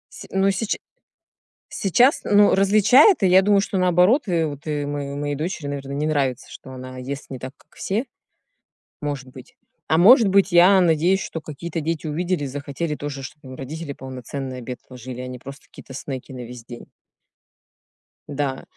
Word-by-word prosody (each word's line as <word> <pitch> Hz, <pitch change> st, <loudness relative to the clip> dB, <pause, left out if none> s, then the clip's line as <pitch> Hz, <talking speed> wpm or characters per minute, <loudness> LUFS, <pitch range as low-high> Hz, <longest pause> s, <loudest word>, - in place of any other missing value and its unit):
Сь -, -, -10 dB
ну, 195 Hz, +1 st, +2 dB
сеча 200 Hz, +3 st, -2 dB, 0.9 s
сейчас, 245 Hz, -, +3 dB
ну, 205 Hz, 0 st, +5 dB
различает, 215 Hz, -, +5 dB
и -, -, +5 dB
я 185 Hz, +1 st, +6 dB
думаю, 200 Hz, +1 st, +3 dB
что, 195 Hz, 0 st, -2 dB
наоборот, 185 Hz, -, +3 dB
э, 170 Hz, -3 st, +1 dB
вот, 145 Hz, -1 st, -7 dB
э, 150 Hz, -2 st, -2 dB
мое 145 Hz, -1 st, -4 dB
моей 145 Hz, 0 st, -2 dB
дочери, 155 Hz, 0 st, -4 dB
наверно, 140 Hz, -1 st, -5 dB
не 145 Hz, +2 st, -1 dB
нравится, 135 Hz, -4 st, -1 dB
что 130 Hz, -, -11 dB
она 130 Hz, 0 st, -9 dB
ест 135 Hz, +2 st, -6 dB
не 130 Hz, -, -6 dB
так, 130 Hz, +1 st, -7 dB
как -, -, -27 dB
все. 215 Hz, +7 st, -2 dB, 1.0 s
Может 140 Hz, -3 st, -4 dB
быть, 130 Hz, 0 st, -14 dB, 0.3 s
а 160 Hz, -, +2 dB
может 225 Hz, -, +7 dB
быть, 195 Hz, 0 st, +3 dB
я 180 Hz, +3 st, +6 dB
надеюсь, 175 Hz, +3 st, +2 dB
что 165 Hz, -, -5 dB
какие-то 160 Hz, +2 st, -6 dB
дети 160 Hz, +1 st, -3 dB
увидели 175 Hz, +1 st, -1 dB
и -, -, -2 dB
захотели 145 Hz, +3 st, -4 dB
тоже, 145 Hz, -2 st, -6 dB
чтобы 140 Hz, +1 st, -11 dB
им 130 Hz, -, -8 dB
родители 145 Hz, +3 st, -6 dB
полноценный 130 Hz, 0 st, -7 dB
обед 125 Hz, 0 st, -7 dB
ложили, 125 Hz, 0 st, -8 dB
а 125 Hz, -, -6 dB
не 125 Hz, 0 st, -8 dB
просто 135 Hz, +3 st, -10 dB
какие-то 130 Hz, -, -13 dB
снеки 135 Hz, 0 st, -7 dB
на 125 Hz, -1 st, -7 dB
весь 120 Hz, -1 st, -11 dB
день. 120 Hz, -1 st, -10 dB, 1.4 s
Да. 140 Hz, -2 st, -3 dB
145 Hz, 180 wpm, -22 LUFS, 135-185 Hz, 1.4 s, может